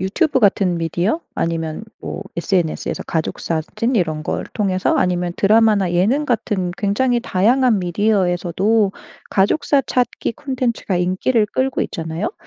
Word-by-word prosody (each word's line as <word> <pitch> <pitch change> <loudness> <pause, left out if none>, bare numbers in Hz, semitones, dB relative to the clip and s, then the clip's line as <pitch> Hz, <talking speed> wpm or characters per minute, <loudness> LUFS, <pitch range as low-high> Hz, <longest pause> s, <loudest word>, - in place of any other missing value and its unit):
유튜브 260 - +1
같은 195 -4 +2
미디어 175 - -1
아니면 165 +2 -2 0.2
뭐 190 - -5
SNS에서 170 -2 -1
가족사진 165 +8 -2
이런 155 -7 0
걸 - - -2
통해서 190 -3 +1
아니면 180 -1 0
드라마나 210 -3 +3
예능 220 +12 +2
같은 200 -7 -1
굉장히 240 +5 +1
다양한 235 +3 +2
미디어에서도 190 +2 +1 0.4
가족사 275 +8 +2
찾기 245 -2 -1
콘텐츠가 250 -7 -2
인기를 185 +6 +1
끌고 260 +5 -1
있잖아요? 165 - -4
195 Hz, 325 characters per minute, -19 LUFS, 175-230 Hz, 0.4 s, 드라마나